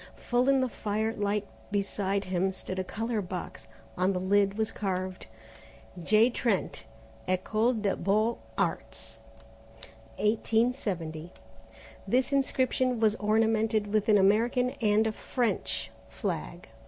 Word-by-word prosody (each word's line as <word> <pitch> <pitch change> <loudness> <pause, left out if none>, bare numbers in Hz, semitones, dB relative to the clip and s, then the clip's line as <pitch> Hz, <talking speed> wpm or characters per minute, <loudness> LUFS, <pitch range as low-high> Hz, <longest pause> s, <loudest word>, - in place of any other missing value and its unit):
Full 245 +2 +1
in 270 -1 +4
the 255 - +1
firelight 210 -2 -1 0.2
beside 200 -1 -1
him 190 0 0
stood 185 0 -5
a - - 0
colour 225 +3 -2
box. 180 - -7 0.3
On 185 +2 +1
the 180 - -1
lid 200 +2 +2
was 220 0 0
carved, 185 - -3 0.7
J. 215 +7 +4
TRENT. 240 0 -1 0.4
Ecole 215 +6 +1
des 210 -4 -1
Beaux 215 +5 +1 0.2
Arts. 110 0 -3 1.0
1870. 210 - 0 0.8
This 255 +6 +1
inscription 255 -2 +1
was 220 -2 +4
ornamented 220 0 +1
with 215 0 +1
an 210 - +6
American 230 +6 +3
and 215 0 +3
a 220 - +1
French 240 +2 -2 0.2
flag. - - -4
210 Hz, 115 wpm, -29 LUFS, 190-225 Hz, 1.0 s, an